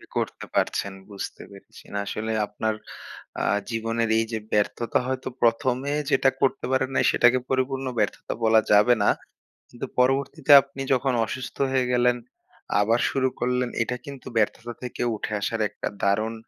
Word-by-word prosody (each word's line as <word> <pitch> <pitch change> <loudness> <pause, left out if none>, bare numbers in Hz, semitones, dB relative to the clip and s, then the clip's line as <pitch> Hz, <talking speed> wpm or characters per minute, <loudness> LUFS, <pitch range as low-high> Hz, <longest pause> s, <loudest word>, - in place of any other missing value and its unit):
করতে - - -2
পারছেন 100 - 0 0.2
বুঝতে 100 -1 -7
পেরেছি। 100 -1 -15
না 100 - -1
আসলে 110 +1 -3 0.2
আপনার 110 +1 -2 0.7
আ - - 0 0.3
জীবনের 115 0 -1
এইযে 115 0 -1
ব্যর্থতা 105 +2 +1
হয়তো 130 0 -3
১ম 120 +2 +3 0.2
এ - - +1 0.2
যেটা 135 0 +4
করতে 135 - +1
পারেন 130 0 +1
না - - +3
সেটাকে 120 +1 +4
পরিপূর্ণ 130 0 0
ব্যর্থতা 105 -1 -1
বলা 110 0 +6
যাবে 105 +4 +6
না। - - +5 0.6
কিন্তু - - -6
পরবর্তীতে 135 +3 +2
আপনি 135 0 -8
যখন 130 +1 +1
অসুস্থ 130 +4 -6
হয়ে 130 -1 +1
গেলেন, 125 0 +3 0.6
আবার 115 +4 +2
শুরু 130 -1 +1
করলেন 125 0 0
এটা 125 +2 -2
কিন্তু 140 -2 -9
ব্যর্থতা 115 +2 0
থেকে 125 -1 -5
উঠে 110 - -5
আসার 115 +2 -2
একটা 100 - -5 0.2
দারুণ 110 +3 +1
120 Hz, 155 wpm, -25 LUFS, 110-130 Hz, 0.7 s, বলা